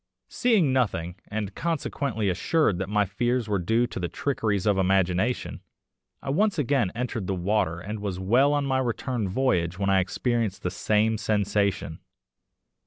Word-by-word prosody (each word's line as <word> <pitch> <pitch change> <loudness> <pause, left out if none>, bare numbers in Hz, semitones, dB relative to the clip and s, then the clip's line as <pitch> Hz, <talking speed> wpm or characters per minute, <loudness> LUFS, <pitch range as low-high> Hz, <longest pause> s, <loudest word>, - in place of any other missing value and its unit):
Seeing 205 - +2
nothing, 100 -9 0
and 105 -2 -4
consequently 140 -8 -2
assured 100 - +1
that 95 0 -3
my 105 0 +2
fears 120 +4 -1
were 100 -2 0
due 115 +7 +2
to 120 - -6
the 90 - -1
trickeries 110 -4 -1
of 100 -2 +2
imagination, 95 +4 +1 0.6
I - - -2
once 205 +7 +2
again 135 - +1
entered 115 -5 -3
the 95 - -1
water 90 -2 0
and 105 +4 -6
was 100 -3 -4
well 120 +10 +3
on 145 -1 +1
my 130 -1 +1
return 120 -3 -2
voyage 90 -7 0
when 100 -1 0
I 95 - +4
experienced 110 +2 -1
the 90 - -1
same 110 +3 +1
sensation. 100 -5 0
105 Hz, 160 wpm, -26 LUFS, 95-125 Hz, 0.6 s, I